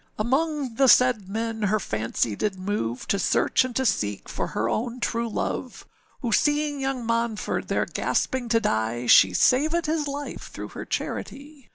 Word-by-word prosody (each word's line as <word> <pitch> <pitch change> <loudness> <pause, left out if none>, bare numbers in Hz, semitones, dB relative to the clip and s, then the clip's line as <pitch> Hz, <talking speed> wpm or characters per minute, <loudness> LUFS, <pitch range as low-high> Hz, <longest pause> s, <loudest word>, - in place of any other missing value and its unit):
âAmong 270 +1 -1
the 270 - +5
said 245 -6 +4
men, 225 +1 -3
her 210 +1 +2
fancy 110 - -2
did 205 - -1
move, 185 - -3
To 200 - 0
search - - +2
and 255 -2 -5
to 265 - 0
seek 105 - -1
for - - -3
her 115 - -2
own 235 - -2
true 235 -1 -1
love, - - -4 0.4
Who 235 - -2
seeing 295 +3 +1
young 270 -3 -2
Monford 230 -1 -1
there - - 0
gasping 255 -2 -1
to 230 -1 +4
die, 115 - -1
She 95 -5 +7
savèd 310 - +3
his 310 -1 -1
life 285 +1 -6
through - - -7
her - - -7
charity. 280 -3 -5
230 Hz, 170 wpm, -25 LUFS, 200-270 Hz, 0.4 s, She